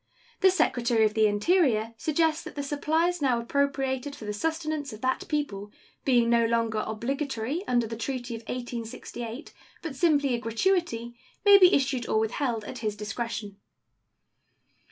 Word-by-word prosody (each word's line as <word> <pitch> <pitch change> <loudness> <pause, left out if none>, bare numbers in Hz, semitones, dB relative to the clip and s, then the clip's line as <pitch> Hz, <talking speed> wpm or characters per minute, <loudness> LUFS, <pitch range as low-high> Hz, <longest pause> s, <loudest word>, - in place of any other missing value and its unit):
The 380 - +6
Secretary 245 -10 +2
of 215 - +1
the 220 -1 +4
Interior 225 - +2
suggests 315 +5 +1
that - - -9
the 285 - -3
supplies 315 +4 0
now 255 -4 +2
appropriated 270 +1 -1
for 220 - -10
the 210 - -3
sustenance 310 +2 -2
of 215 - -10
that 260 0 -1
people, 210 -10 -3 0.3
being 245 -3 +4
no 235 0 +4
longer 230 -2 0
obligatory 265 - -3
under 240 -2 +2
the 225 +1 -5
treaty 240 +1 -4
of 225 - -6
1868, 240 +1 -6 0.3
but 320 -5 -5
simply 285 -3 +2
a 240 - 0
gratuity, 235 - 0 0.3
may 405 -1 +9
be 365 -1 +7
issued 265 -5 +1
or - - +2
withheld 220 +1 -1
at 250 - -7
his 215 -2 -2
discretion. 210 -1 -5
250 Hz, 155 wpm, -27 LUFS, 225-295 Hz, 0.3 s, may